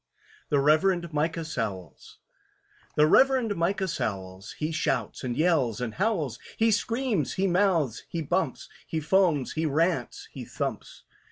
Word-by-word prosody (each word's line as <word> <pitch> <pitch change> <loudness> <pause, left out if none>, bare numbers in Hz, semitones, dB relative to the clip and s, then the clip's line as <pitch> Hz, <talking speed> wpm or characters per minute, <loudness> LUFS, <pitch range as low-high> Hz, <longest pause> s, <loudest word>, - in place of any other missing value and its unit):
THE 145 - +2
REVEREND 165 +4 +2
MICAH 160 +2 -1
SOWLS 105 - -5 0.8
THE 150 - +5
REVEREND 250 +4 +4
MICAH 190 +3 0
SOWLS, 95 - -4
He 155 +1 -3
shouts 165 -2 -1
and 125 -2 -3
yells 155 - +2
and 120 -3 -3
howls, 185 - -1 0.2
He 225 0 +3
screams, 230 - 0
he 190 - 0
mouths, 175 - +1
he 165 -1 -3
bumps, 175 +6 -1 0.2
He 160 - -2
foams, 160 -3 +2
he 160 0 -1
rants, 155 -2 0
he - - -7
thumps. - - -5
160 Hz, 140 wpm, -27 LUFS, 140-190 Hz, 0.8 s, THE